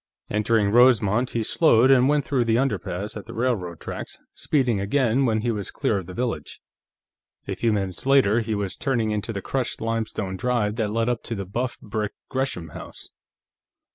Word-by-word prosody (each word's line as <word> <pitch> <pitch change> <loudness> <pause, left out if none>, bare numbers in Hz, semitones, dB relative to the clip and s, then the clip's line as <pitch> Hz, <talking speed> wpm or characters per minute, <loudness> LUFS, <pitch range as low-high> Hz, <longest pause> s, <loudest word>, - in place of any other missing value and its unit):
Entering 105 -1 +2
Rosemont, 120 -1 +4
he 115 - -1
slowed 130 -1 +4
and 130 0 +5
went 145 -1 +2
through 130 -4 +1
the 115 -1 +2
underpass 105 -5 -2
at 105 - -8
the - - -8
railroad 110 -9 -1
tracks, - - -6 0.2
speeding 125 -8 +1
again 125 +5 +2
when 110 -2 +1
he 120 +1 0
was 105 -3 -3
clear 100 - 0
of 90 - -9
the 90 - -8
village. 115 - -3 0.9
A - - -2
few 115 - +1
minutes 95 +2 -2
later, 130 -5 +5
he 110 -1 -2
was 100 -2 -3
turning 120 -6 0
into 105 +2 -2
the 100 -3 -5
crushed 130 -3 -2
limestone 110 -4 -2
drive 115 -2 0
that 110 -3 0
led 115 +2 0
up 120 -2 0
to 115 - -3
the 100 -2 -4
buff 120 +7 -3
brick 105 -1 -3 0.2
Gresham 130 - -2
house. - - -9
115 Hz, 185 wpm, -24 LUFS, 100-125 Hz, 0.9 s, and